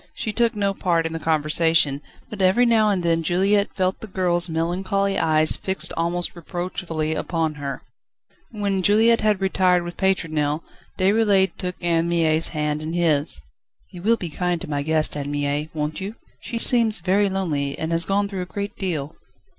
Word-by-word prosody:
She 215 - -3
took 235 0 +1
no 200 -1 0
part 170 -4 0
in 165 - -3
the 165 - -3
conversation, 155 -2 +2 0.3
but 210 -2 -7
every 190 +7 +4
now 225 -2 +4
and 190 -3 0
then 165 -1 +2
Juliette 195 +5 +1
felt 185 0 0
the 220 - -8
girl's 180 -3 -1
melancholy 190 +4 -1
eyes 155 -1 +3
fixed 190 0 -1
almost 170 +2 -1
reproachfully 170 -2 -4
upon 160 0 -1
her. 140 -1 -5 0.7
When 200 -3 -1
Juliette 220 +4 +4
had 215 -2 +2
retired 185 -2 +2
with 175 0 -7
Pétronelle, 155 -5 0 0.3
Déroulède 195 -1 +3
took 180 -1 -4
Anne 170 -1 +1
Mie's 165 -1 +2
hand 150 -1 -2
in 155 +1 -4
his. 155 - +2 0.5
"You 180 - -10
will 230 +5 +3
be 175 -6 -6
kind 180 +2 -1
to - - -6
my 145 -1 -2
guest, 155 +1 +1
Anne 145 -1 -4
Mie, 145 +1 -1
won't 150 +2 -3
you? 200 +4 -5 0.3
She 230 - -5
seems 230 -2 +2
very 195 +3 +2
lonely, 150 -8 -2
and 160 +1 -3
has 165 0 +3
gone 200 +2 0
through 195 -2 -5
a - - -3
great 200 +2 -5
deal." 155 -7 -3
175 Hz, 180 wpm, -22 LUFS, 160-195 Hz, 0.7 s, every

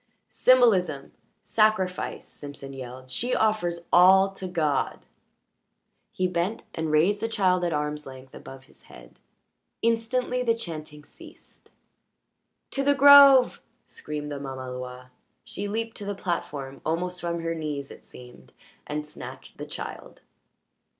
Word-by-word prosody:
"Symbolism! 190 - +3 0.3
Sacrifice!" 215 -4 0
Simpson 140 -1 -10
yelled. 130 0 -9
"She 245 - -1
offers 175 -6 0
all 190 +2 +6
to 195 -1 -7
God!" 155 -6 -1 1.1
He 185 - -1
bent 180 +4 -2
and 160 -1 -3
raised 170 +7 +3
the 225 - -2
child 185 -5 +1
at 175 - 0
arm's 150 -1 -3
length 130 0 -12
above 135 0 -11
his - - -21
head. - - -16 0.6
Instantly 230 +2 0
the 230 -2 +2
chanting 155 -7 -8
ceased. - - -17 1.0
"To 275 - -1
the 285 +1 +3
grove!" 280 -2 +8 0.2
screamed 150 -1 -7
the 145 - -5
mamaloi. 125 -2 -7 0.3
She 205 - -5
leaped 225 +2 -4
to 205 - -7
the 200 0 -3
platform, 145 -7 -4
almost 180 +3 -2
from 170 -1 -3
her 165 0 -2
knees 150 -4 -5
it - - -13
seemed, 125 -1 -15 0.3
and 150 0 -4
snatched 150 - -11
the - - -6
child. - - -9
170 Hz, 130 wpm, -26 LUFS, 145-215 Hz, 1.1 s, grove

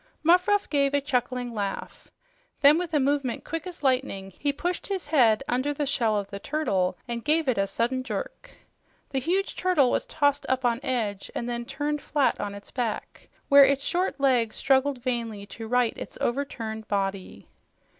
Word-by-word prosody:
Muffruff 365 +5 +4
gave 280 -1 +2
a - - +4
chuckling 250 -3 -2
laugh. 200 -3 -5 0.5
Then, 295 +3 +7
with 355 -2 -3
a 300 - +2
movement 275 -2 0
quick 330 +2 -4
as 355 -4 -9
lightning, 255 -8 0
he 285 - +1
pushed 350 +5 -3
his 390 -3 -3
head 260 -6 +4
under 265 +4 0
the 290 - -1
shell 230 -6 +1
of 200 -1 -2
the 200 - -5
turtle 195 -11 0
and 235 -1 -4
gave 310 0 +2
it 250 -6 +1
a 195 - +2
sudden 235 +6 -1
jerk. - - -5 0.6
The 270 - 0
huge 370 +9 -1
turtle 350 -9 +3
was - - -1
tossed 285 -2 +1
up 260 -1 0
on 235 -1 +2
edge 225 -8 -2
and 235 - -3
then 240 0 -3
turned 290 +3 -2
flat 290 -3 +2
upon 200 0 -4
its 200 - -12
back, 235 -4 -4 0.2
where 280 -1 +8
its 275 0 +3
short 360 -3 -1
legs 245 -5 +2
struggled 275 0 +2
vainly 235 -5 -3
to 225 +2 -8
right 245 0 +2
its - - -8
overturned 225 -4 -3
body. 195 -2 -3
260 Hz, 180 wpm, -26 LUFS, 230-290 Hz, 0.6 s, where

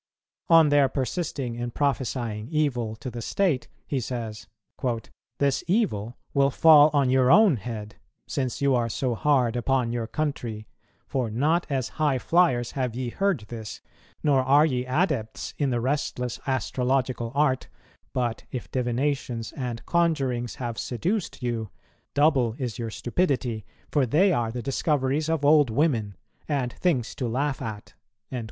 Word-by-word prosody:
On 165 -2 +7
their 145 -2 +4
persisting 135 -2 -2
in 120 +1 -4
prophesying 120 -5 -2
evil 130 -8 0
to 125 +3 -7
the 120 0 -6
state, 165 - 0 0.2
he 140 - -1
says, 115 -3 -5 0.9
"This 140 -1 +1
evil 125 - 0 0.2
will 140 -1 +4
fall 150 +1 +7
on 140 -3 +2
your 130 -1 +4
own 190 - +6
head, 105 -1 -7 0.3
since 130 0 -3
you 140 -1 +4
are 120 -2 +1
so 125 +2 -1
hard 125 -1 +2
upon 125 -1 +1
your 120 -1 -2
country; 120 -8 -3 0.4
for 130 -4 -2
not 150 +10 +1
as 130 -4 -1
high 145 -4 +3
flyers 130 -5 +2
have 125 -4 -2
ye 125 -1 -2
heard 195 - 0
this, 110 -3 -7 0.4
nor 140 -3 +4
are 140 +4 +5
ye 125 -5 -1
adepts 130 - -1
in 145 -2 +2
the 120 -2 0
restless 125 -1 -2
astrological 130 -1 0
art, 140 -3 +2 0.4
but 120 -3 -2
if 125 - -6
divinations 125 -2 -1
and 125 -4 -5
conjurings 135 -9 0
have 120 -3 -4
seduced 170 - -2
you, 115 -3 -2 0.5
double 140 -6 +3
is 125 -2 -4
your 115 -1 -3
stupidity; 120 - -1 0.2
for 140 -4 +2
they 180 - +4
are 115 -5 0
the 120 0 -5
discoveries 140 +2 0
of 160 -3 0
old 145 -3 +6
women 115 -6 0 0.3
and 135 -5 -1
things 135 -10 0
to 125 - -3
laugh 135 +4 -1
at." 105 -2 -6
130 Hz, 145 wpm, -26 LUFS, 120-145 Hz, 0.9 s, On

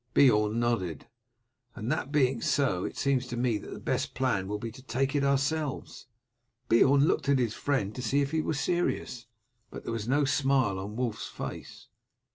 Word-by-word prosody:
Beorn 105 -5 +4
nodded. 95 -10 -1 0.7
"And 110 +5 -3
that 150 -2 -2
being 130 -5 +2
so, 95 -11 +1
it - - -6
seems 135 -2 +1
to 120 - -5
me 120 -3 +1
that - - -10
the - - -7
best - - -2
plan 115 -8 0
will 105 +1 -2
be 115 +2 -6
to 130 +4 -13
take 135 +2 -1
it 140 - +2
ourselves." 140 0 -1 0.6
Beorn 140 +5 +5
looked 155 - 0
at 140 - +5
his 120 -4 0
friend 125 -8 -1
to 125 - -6
see 130 +4 +1
if 140 0 0
he 160 0 +1
were 155 - -2
serious, 145 -6 -1 0.4
but - - -9
there - - -4
was 110 -1 -4
no 145 +3 +3
smile 135 -8 +2
on 100 +3 -6
Wulf's 120 -3 -2
face. - - -8
130 Hz, 190 wpm, -29 LUFS, 110-140 Hz, 0.7 s, Beorn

